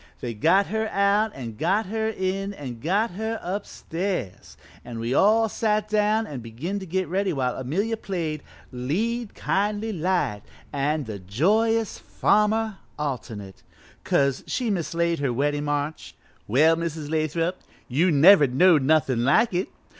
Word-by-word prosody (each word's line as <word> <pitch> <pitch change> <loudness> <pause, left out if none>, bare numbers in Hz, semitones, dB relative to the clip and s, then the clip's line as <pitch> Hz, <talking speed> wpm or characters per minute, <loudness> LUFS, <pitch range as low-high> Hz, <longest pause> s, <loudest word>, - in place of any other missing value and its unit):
They 120 -2 -4
got 170 - +3
her 220 +2 -2
out 200 +2 +2
an' 115 -5 -7
got 195 - +1
her 220 +3 -1
in 195 -1 -2
an' 125 -7 -7
got 200 - 0
her 220 +4 -3
upstairs, 180 - -4 0.3
an' 120 -1 -8
we 115 +2 -2
all 220 +7 +4
sat 215 -1 0
down 215 +1 +2
an' 145 -10 -6
begin 125 - -5
to 190 - -8
get 185 +1 -1
ready 190 +3 0
while 130 -3 -1
Amelia 195 - -2
played 170 -8 -3 0.3
'Lead, 205 - -2
Kindly 210 +2 -1
Light' 175 - 0 0.3
and 145 +1 0
'The 110 -3 -6
Joyous 210 - +1
Farmer' 215 0 +1 0.2
alternate, 115 -9 -5 0.4
'cause 140 -1 +1
she'd 240 -5 -1
mislaid 170 -2 -1
her 140 -3 0
Weddin' 145 +4 0
March. 145 +1 -3 0.3
"Well, 155 +9 +4
Mrs. 165 -2 -4
Lathrop, 165 +3 -1 0.3
you 155 +9 +2
never 155 +1 +7
knowed 150 +5 +4
nothin' 130 -4 +2
like 205 - +3
it! 180 +3 -1
170 Hz, 145 wpm, -25 LUFS, 140-205 Hz, 0.4 s, never